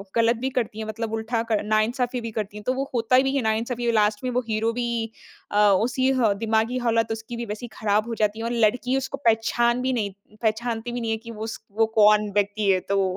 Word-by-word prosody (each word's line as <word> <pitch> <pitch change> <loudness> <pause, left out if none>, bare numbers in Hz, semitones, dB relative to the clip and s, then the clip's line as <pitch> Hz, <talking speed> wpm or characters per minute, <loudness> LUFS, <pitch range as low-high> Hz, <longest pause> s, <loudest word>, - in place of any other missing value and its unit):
गलत 230 +1 +4
भी 265 - 0
करती 230 -4 -2
है 220 - -3
मतलब 225 +1 -4
उल्टा 225 +1 -1
क 215 - +4
नाइंसाफी 240 +4 0
भी 230 -1 -5
करती 210 -1 -4
है 210 - -9
तो 255 - +3
वो 275 +1 -3
होता 235 +1 +3
भी 270 +1 0
है 275 - +2
नाइंसाफी 235 +2 0
लास्ट 210 -1 +2
में 255 - -1
वो 250 +1 +1
हीरो 220 +1 0
भी 235 -2 -2 0.4
अ, 205 - 0 0.3
उसी 255 +2 +1
ह 215 -3 +4
दिमागी 225 +2 +1
हालत 230 -2 +1
उसकी 225 +2 -5
भी 235 - -4
वैसी 215 +3 -6
ख़राब 215 +1 0
हो 235 - -3
जाती 215 0 0
है 225 - -3
और 235 - -1
लड़की 250 +4 +1
उसको 270 +1 -3
पहचान 235 +2 +2
भी 260 0 0
नहीं 210 -5 -1 0.3
पहचानती 225 +1 -1
भी 245 0 -3
नहीं 225 -1 -1
है 220 - 0
कि - - -5
उस 220 0 -6 0.2
वो 225 - +5
कौन 210 0 +5
व्यक्ति 205 0 +1
है 185 - +3
तो 200 0 +2
225 Hz, 230 wpm, -24 LUFS, 215-240 Hz, 0.4 s, वो